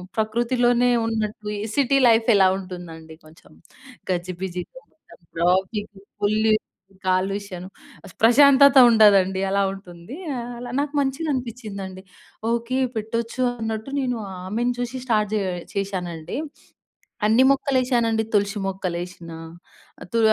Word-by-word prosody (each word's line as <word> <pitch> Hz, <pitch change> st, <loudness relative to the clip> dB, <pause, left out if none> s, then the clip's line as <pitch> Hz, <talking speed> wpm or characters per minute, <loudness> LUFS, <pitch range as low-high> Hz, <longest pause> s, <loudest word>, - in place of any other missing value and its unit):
ప్రకృతిలోనే 240 Hz, +2 st, +1 dB, 0.2 s
ఉన్నట్టు 215 Hz, -2 st, -3 dB
ఈ -, -, -4 dB, 0.2 s
city 275 Hz, 0 st, +2 dB
life 225 Hz, -1 st, +4 dB
ఎలా 190 Hz, -1 st, +6 dB
ఉంటుందండి 170 Hz, -4 st, -9 dB
కొంచెం 155 Hz, +2 st, -19 dB, 0.6 s
గజిబిజిగా 180 Hz, -, -4 dB
మొత్తం 315 Hz, -, -21 dB
ట్రాఫిక్, 190 Hz, +5 st, 0 dB, 0.3 s
ఫుల్ 210 Hz, +1 st, +1 dB, 0.7 s
కాలుష్యం 185 Hz, 0 st, -1 dB, 0.6 s
ప్రశాంతత 280 Hz, +4 st, +6 dB
ఉండదండి 195 Hz, -4 st, +5 dB
అలా 200 Hz, 0 st, +2 dB
ఉంటుంది. 180 Hz, +3 st, -11 dB, 0.4 s
అలా 245 Hz, 0 st, -7 dB
నాకు 290 Hz, +1 st, -2 dB
మంచిగా 275 Hz, +4 st, -2 dB
అనిపిచ్చిందండి. 215 Hz, -7 st, -6 dB, 0.5 s
ఓకే. 235 Hz, +2 st, -1 dB, 0.2 s
పెట్టొచ్చు 230 Hz, +3 st, -3 dB, 0.2 s
అన్నట్టు 225 Hz, +3 st, -4 dB
నేను 250 Hz, -3 st, -1 dB, 0.3 s
ఆమెను 235 Hz, +5 st, -1 dB
చూసి 245 Hz, +1 st, -3 dB
స్టార్ట్ 215 Hz, -4 st, +1 dB
జేయ 195 Hz, -3 st, -1 dB, 0.2 s
చేశానండి. 180 Hz, -4 st, -4 dB, 0.9 s
అన్ని 240 Hz, +4 st, +5 dB
మొక్కలేసానండి. 245 Hz, -5 st, +1 dB
తులసి 205 Hz, +1 st, +1 dB
మొక్కలేసినా 175 Hz, -3 st, -5 dB, 0.7 s
తు 230 Hz, -, +2 dB
215 Hz, 105 wpm, -23 LUFS, 185-240 Hz, 0.9 s, ఎలా